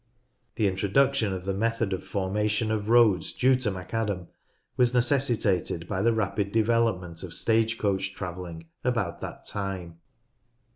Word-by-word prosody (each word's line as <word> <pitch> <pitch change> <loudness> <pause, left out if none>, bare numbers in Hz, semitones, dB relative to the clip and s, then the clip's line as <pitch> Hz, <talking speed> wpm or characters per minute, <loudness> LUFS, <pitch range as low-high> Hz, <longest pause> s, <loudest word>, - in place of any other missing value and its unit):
The 110 - +1
introduction 105 +5 +2
of 95 -1 -5
the 100 - 0
method 115 0 0
of 95 - -4
formation 105 +3 -1
of 110 -1 -2
roads 115 -8 +4
due 130 +1 +4
to 125 -4 -1
McAdam 95 0 -3 0.5
was 125 0 +3
necessitated 115 - +1
by 95 -2 -2
the 115 +3 +4
rapid 100 -2 -1
development 110 -7 +1
of 90 -3 -5
stage 115 0 +2
coach 95 -2 -1
travelling 85 -3 -6 0.2
about 110 -9 -1
that - - -7
time. 95 -4 -4
105 Hz, 140 wpm, -27 LUFS, 95-115 Hz, 0.5 s, roads